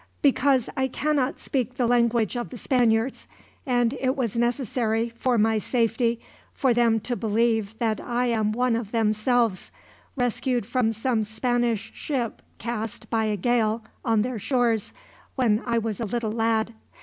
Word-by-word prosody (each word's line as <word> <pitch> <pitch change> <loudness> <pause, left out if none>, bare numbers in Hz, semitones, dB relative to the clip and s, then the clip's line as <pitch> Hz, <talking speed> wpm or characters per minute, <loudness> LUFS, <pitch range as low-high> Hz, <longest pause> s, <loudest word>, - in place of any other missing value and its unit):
"Because 270 -2 +3
I 265 -2 +1
cannot 280 0 0
speak 255 -2 -2
the 250 -2 +1
language 235 -2 +2
of 240 -1 -3
the 250 - -8
Spaniards; 240 -1 +1 0.4
and 245 -1 +2
it 260 0 +1
was 240 -7 -2
necessary, 235 -1 0
for 235 +1 0
my 220 0 +3
safety, 230 0 0 0.4
for 260 -3 +2
them 230 -1 +3
to 245 +3 -2
believe 225 -1 0
that 225 -2 0
I 245 0 -1
am 220 -3 +1
one 245 +1 +1
of 225 -3 -4
themselves, 225 -1 +1 0.5
rescued 245 -2 0
from 240 -1 +1
some 225 +1 0
Spanish 230 0 -1
ship 250 -6 -3 0.2
cast, 225 -2 -5
by 225 -1 +2
a 210 -1 0
gale, 225 +1 +1 0.2
on 225 -3 +2
their 245 -2 -3
shores 230 -1 +1 0.4
when 230 -4 +2
I 235 -1 +1
was 225 -3 -2
a 230 - -1
little 220 +1 -2
lad. 225 0 0
235 Hz, 155 wpm, -25 LUFS, 220-245 Hz, 0.5 s, Because